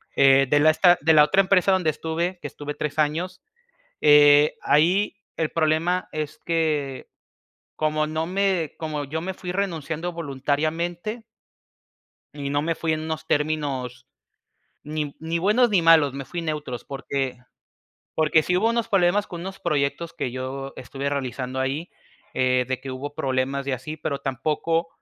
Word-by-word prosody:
Eh, 135 0 +5
de 145 - +4
la 155 +2 +6
esta 175 +2 +5
de 160 +3 +4
la 150 -1 +8
otra 190 +6 +4
empresa 195 0 +3
donde 180 -4 +2
estuve, 170 +4 -3
que - - -4
estuve 145 0 -6
3 150 -1 -4
años, 160 +5 -1 0.6
eh, 145 0 +6
ahí 180 +8 +3 0.2
el 160 -2 -1
problema 165 +3 +1
es 155 0 -4
que, 155 -5 -1 0.7
como 155 0 0
no 155 +1 -2
me 185 -4 0
como 155 -2 -3
yo 155 +3 -4
me 190 +2 -3
fui 180 -1 -7
renunciando 175 -3 -3
voluntariamente. 165 - -2 1.1
Y 140 -1 -5
no 145 +1 +1
me 165 +1 -1
fui 160 0 -1
en 155 - -2
unos 160 0 -4
términos 145 -5 -1 0.8
ni 150 -1 -4
ni 165 +1 -2
buenos 215 +7 +3
ni 190 -5 +3
malos, 160 -4 +6
me 140 0 -6
fui 175 +4 -5
neutros 150 -6 -4
porque 135 -2 -3 0.8
porque 155 0 +3
sí 180 - 0
hubo 220 +5 +2
unos 235 -1 0
problemas 195 +1 +2
con 170 -1 -7
unos 190 +2 -7
proyectos 150 +3 -1
que 135 -7 -3
yo 130 +2 -5
estuve 135 +2 -4
realizando 130 -2 -3
ahí, 140 +6 -2 0.4
eh, 130 -1 +2
de 130 -1 -2
que 135 +1 -8
hubo 140 +3 -6
problemas 135 -1 -1
y - - 0
así, 150 +5 -6
pero 140 -2 -3
tampoco 155 +5 -1
155 Hz, 160 wpm, -24 LUFS, 140-170 Hz, 1.1 s, la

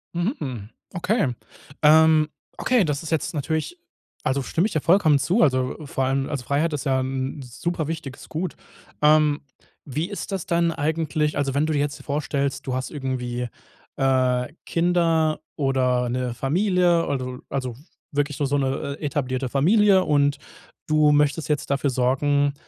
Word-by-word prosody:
Mhm, 180 +10 0
mhm. 120 -6 -5 0.2
Okay. 180 - 0 0.5
Ähm, 155 0 +6 0.3
okay, 250 -4 +3
das 150 -3 -2
ist 160 - -6
jetzt 160 +1 -1
natürlich 160 - -2 0.5
also 135 +1 0
stimme 170 +9 +1
ich - - -8
dir 155 - 0
vollkommen 165 -4 +4
zu. 175 - +1
Also, 130 -2 +1
äh, 155 - -9
vor 135 - -1
allem 135 +1 0
also 140 -4 -3
Freiheit 150 +5 0
ist 145 - -2
ja 130 -1 +2
'n 130 +2 -3
'n - - -6
super 155 +5 -3
wichtiges 155 -5 -6
Gut. 170 +3 -4 0.5
Ähm, 150 0 +4 0.4
wie 155 +5 -3
ist 205 - -6
das 190 -4 -3
dann 170 0 +2
eigentlich 155 -1 -1
also 140 -2 0
wenn 145 +3 +2
du 160 - -1
dir 145 - +1
jetzt 145 0 -2
vorstellst, 140 -2 -2
du 130 - -1
hast 130 0 -3
irgendwie, 125 -4 -3 0.5
äh, 130 -2 +2 0.2
Kinder 165 -2 +2 0.2
oder 130 -3 +1
'ne 125 0 -2
Familie, 175 - +2
also 130 -2 -3
also 130 -3 -3 0.4
wirklich 145 0 -1
so - - -1
so 140 +1 +1
'ne, 140 +1 -2
äh, - - -5
etablierte 130 -2 -1
Familie 190 - +4
und 145 -3 +2 0.5
du 155 -1 +4
möchtest 150 +2 +2
jetzt 150 -1 -1
dafür 140 +1 +1
sorgen, 140 +3 +2
145 Hz, 165 wpm, -23 LUFS, 135-160 Hz, 0.5 s, Ähm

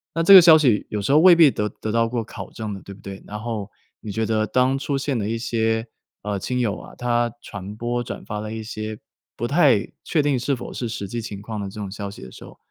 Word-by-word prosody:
那 165 - +1
这 195 - +8
个 185 - +12
消 165 -2 +8
息 125 -9 +2
有 105 - -2
时 100 +7 -1
候 150 - +6
未 175 0 +8
必 160 -5 +7
得 105 0 -2
得 110 - -6
到 115 0 +2
过 120 -2 -2
考 - - -9
证 110 -2 -6
的 95 - -8
对 100 - -10
不 - - -18
对， 100 0 -8
然 105 +1 -6
后 110 -3 -4 0.3
你 105 - -7
觉 110 +2 -1
得 110 -1 0
当 130 +4 +2
出 140 0 -2
现 135 -3 -1
了 105 - -2
一 115 +1 -1
些， 115 -1 0 0.4
呃， 105 -2 -2
亲 125 +5 -2
友 105 -3 0
啊， - - -13
他 120 -1 0
传 100 +1 -8
播 120 +2 -2
转 - - -7
发 105 -1 -4
了 110 0 -6
一 110 0 -5
些 110 0 -6 0.4
不 120 - -3
太 140 - +3
确 155 - +2
定 140 -4 +1
是 135 +2 0
否 - - -8
是 120 - -3
实 100 -2 -4
际 120 +1 -3
情 105 -3 -7
况 110 0 -6
的 100 -1 -4
这 105 +2 -10
种 95 -2 -5
消 100 0 -5
息 100 - -11
的 65 - -10
时 - - -12
候， - - -14
115 Hz, 295 characters per minute, -22 LUFS, 105-125 Hz, 0.4 s, 个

